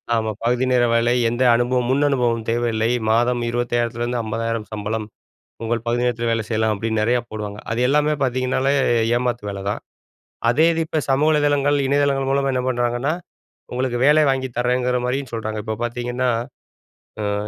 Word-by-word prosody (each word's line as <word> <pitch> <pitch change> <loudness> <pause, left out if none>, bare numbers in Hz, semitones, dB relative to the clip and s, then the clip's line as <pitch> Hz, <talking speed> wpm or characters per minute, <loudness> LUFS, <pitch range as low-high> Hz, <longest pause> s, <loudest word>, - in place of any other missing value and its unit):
ஆமா. 110 -1 0
“பகுதி 125 +2 +2
நேர 125 -1 +4
வேலை, 120 +1 +3 0.2
எந்த 120 +2 0
அனுபவம் 120 +1 +1
முன் 140 +2 +2
அனுபவம் 120 -4 0
தேவையில்லை, 115 -1 0 0.2
மாதம் 120 +1 +2
25,000த்துலருந்து 120 0 -1
50,000 115 0 -3
சம்பளம், 110 +1 -3 0.6
உங்கள் 115 0 -2
பகுதி 120 +1 +1
நேரத்தில 120 -1 0
வேலை 115 -2 -1
செய்யலாம்,” 110 -1 +1
அப்படின்னு 110 +1 -1
நிறையா 120 +2 +2
போடுவாங்க. 105 -1 -5
அது 115 - -2
எல்லாமே 150 +1 +2
பாத்தீங்கன்னாலே 130 +1 +1 0.4
ஏமாத்து 120 -3 -2
வேலதான். 100 +1 -4 0.7
அதே 150 +7 +3
இது 165 - -1
இப்போ 160 - -1
சமூக 140 +3 +3
வலைதளங்கள், 145 -1 +2
இணையதளங்கள் 140 -1 +1
மூலமா 140 0 +1
என்ன 125 - 0
பண்றாங்கன்னா, 120 +3 0 0.6
உங்களுக்கு 125 0 -1
வேலை 150 +1 +6
வாங்கிதரேங்கிற 125 -1 0
மாரியும் 130 +2 -2
சொல்றாங்க. 110 -1 -3
இப்ப 110 -1 -3
பாத்தீங்கன்னா, 120 +1 -2 1.0
அ - - 0
120 Hz, 150 wpm, -21 LUFS, 115-130 Hz, 1.0 s, வேலை